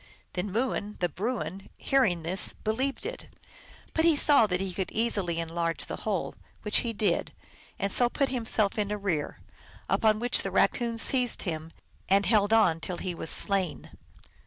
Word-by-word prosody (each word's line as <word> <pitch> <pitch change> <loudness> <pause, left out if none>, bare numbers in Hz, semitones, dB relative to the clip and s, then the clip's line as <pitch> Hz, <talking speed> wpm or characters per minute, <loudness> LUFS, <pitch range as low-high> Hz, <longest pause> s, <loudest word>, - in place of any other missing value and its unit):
Then 185 +2 -3
Mooin, 215 -2 -2
the 175 - 0
Bruin, 195 - -4
hearing 220 -12 +1
this, 185 +4 +2
believed 260 - -2
it, - - -5 0.7
but 320 - +1
saw 285 -7 +5
that 180 -2 -1
he 190 -1 -3
could 190 0 -3
easily 200 -7 0
enlarge 165 0 -3
the - - -6
hole, 205 -5 -3 0.3
which 210 - +3
he 235 - -3
did, 205 -5 -1 0.5
and 200 0 -2
so 245 +3 +5
put 275 +2 0
himself 225 -4 0
in 205 -1 -1
arrear; 195 -8 -2 0.5
upon 215 -1 +2
which 245 +2 +3
the - - -3
Kaccoon 235 -2 +1
seized 250 +1 +2
him, 160 -3 -5 0.4
and 195 +1 +4
held 210 -2 +3
on 200 -8 +4
till 175 +1 -5
he 185 0 -4
was 165 - -4
slain. 195 -5 +1
205 Hz, 160 wpm, -28 LUFS, 180-230 Hz, 0.7 s, saw